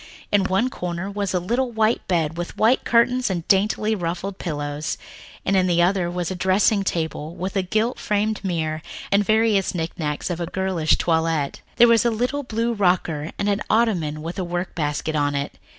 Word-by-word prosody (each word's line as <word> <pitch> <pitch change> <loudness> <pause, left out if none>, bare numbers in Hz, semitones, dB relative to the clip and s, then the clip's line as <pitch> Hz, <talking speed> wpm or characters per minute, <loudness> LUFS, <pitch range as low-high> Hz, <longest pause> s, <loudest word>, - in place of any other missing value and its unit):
In 205 -2 +3
one 195 +7 +1
corner 180 0 -4
was 200 -1 -2
a 180 - +1
little 240 +8 -1
white 220 0 +1
bed 165 -3 0
with 175 0 -5
white 230 +4 +3
curtains 245 +1 +3
and 175 -3 -3
daintily 210 +2 +2
ruffled 185 +1 -3
pillows, 145 -2 -3 0.5
and 195 - +2
in 185 -1 +3
the 175 -1 +3
other 180 0 +2
a 175 +1 -2
dressing 190 +3 +2
table 160 -3 -3
with 185 +2 -4
a 195 - +3
gilt 215 +6 0
framed 210 0 -1
mirror 160 -4 -2 0.3
and 200 +1 +5
the - - -2
various 220 -4 +2
knick 165 +1 -4
knacks 150 +3 -2
of 175 - -3
a 170 - -2
girlish 185 -4 +1
toilet. 160 -3 0
There 240 0 +7
was 230 -2 +5
a 240 - +3
little 245 +6 -1
blue 235 -2 -1
rocker 180 -6 +1
and 200 - -1
an 205 0 +1
ottoman 175 -10 +1
with 170 +4 -5
a - - 0
work 175 +1 -3
basket 150 0 -2
on 145 -1 +1
it. 140 0 -4
185 Hz, 195 wpm, -23 LUFS, 165-215 Hz, 0.5 s, There